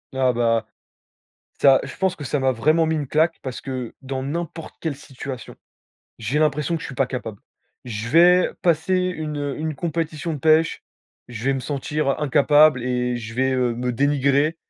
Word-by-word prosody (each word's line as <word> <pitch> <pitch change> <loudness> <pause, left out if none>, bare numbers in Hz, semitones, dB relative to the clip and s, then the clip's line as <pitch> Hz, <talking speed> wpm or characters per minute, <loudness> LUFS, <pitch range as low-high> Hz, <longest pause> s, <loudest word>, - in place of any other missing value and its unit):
Ah, 130 -1 +3
bah. 115 -2 +1 0.9
Ça 135 -1 +7
je - - -8
pense 190 -1 0
que 145 - -7
ça 145 +2 -1
m'a 130 0 +2
vraiment 155 +7 +2
mis 160 - 0
une 150 -2 -2
claque 160 +4 +2
parce 130 -2 -5
que 130 -3 -5
dans 130 0 -4
n'importe 165 +2 -5
quelle 160 -4 -3
situation, 135 -2 -8 0.6
j'ai 115 +6 -1
l'impression 150 +1 +1
que - - -7
je - - -5
suis 135 - -8
pas 135 +1 +1
capable. 115 -5 -6 0.4
Je 115 -2 -5
vais 175 +5 +5
passer 170 +1 +2
une, 170 -5 -2
heu, 145 -1 -3
une 155 0 -3
compétition 165 +1 -3
de - - -5
pêche, 160 +3 +2 0.4
je 115 -3 -8
vais 135 - +3
me - - -2
sentir, 145 +2 -2
heu, - - +1
incapable 145 -1 +4
et 125 -1 -1
je 115 -1 -7
vais, 130 +2 +1
heu, 125 -2 +1
me 125 +1 -2
dénigrer. 140 +3 +2
140 Hz, 190 wpm, -22 LUFS, 125-155 Hz, 0.9 s, Ça